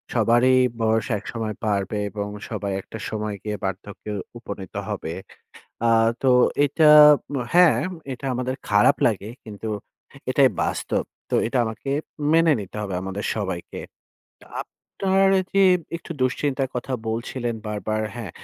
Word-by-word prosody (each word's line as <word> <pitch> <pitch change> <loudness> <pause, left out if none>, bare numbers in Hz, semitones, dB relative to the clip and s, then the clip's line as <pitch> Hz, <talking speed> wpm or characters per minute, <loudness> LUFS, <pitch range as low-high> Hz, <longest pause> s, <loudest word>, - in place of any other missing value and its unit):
সবারই 120 +2 +4 0.3
বয়স 110 0 +2
একসময় 110 -1 -5
বাড়বে। 100 0 0
এবং 105 0 -4 0.2
সবাই 100 -3 -3
একটা 110 - -9
সময় 105 -1 -3
গিয়ে 105 -1 -3
বার্ধক্যে 100 +2 -5 0.3
উপনীত 100 -5 -8 0.2
হবে। 85 -5 -4 0.7
আ - - +4 0.3
তো 135 - +3 0.4
এটা 150 +2 +4 0.4
ম - - -1 0.2
হ্যাঁ 180 -2 +7 0.4
এটা 135 - -8
আমাদের 130 +1 -2
খারাপ 105 0 +5
লাগে 105 -1 -2
কিন্তু 110 0 -8 0.6
এটাই - - +5
বাস্তব। - - -1 0.3
তো - - +1
এটা 125 - -1
আমাকে 110 +5 -5 0.4
মেনে 165 -1 +5
নিতে 100 +1 -8
হবে 100 -3 -4
আমাদের 95 +2 -4
সবাইকে। 95 -5 -4 0.6
তা - - -16
আ - - 0 0.4
আপনার 195 0 +4 0.2
যে 195 - +5 0.3
একটু 170 - -14
দুশ্চিন্তার 135 +1 0
কথা 125 +2 -4 0.2
বলছিলেন 120 +1 -3
বারবার। 105 +1 -2
হ্যাঁ? 115 -7 -6
110 Hz, 135 wpm, -23 LUFS, 105-130 Hz, 0.7 s, হ্যাঁ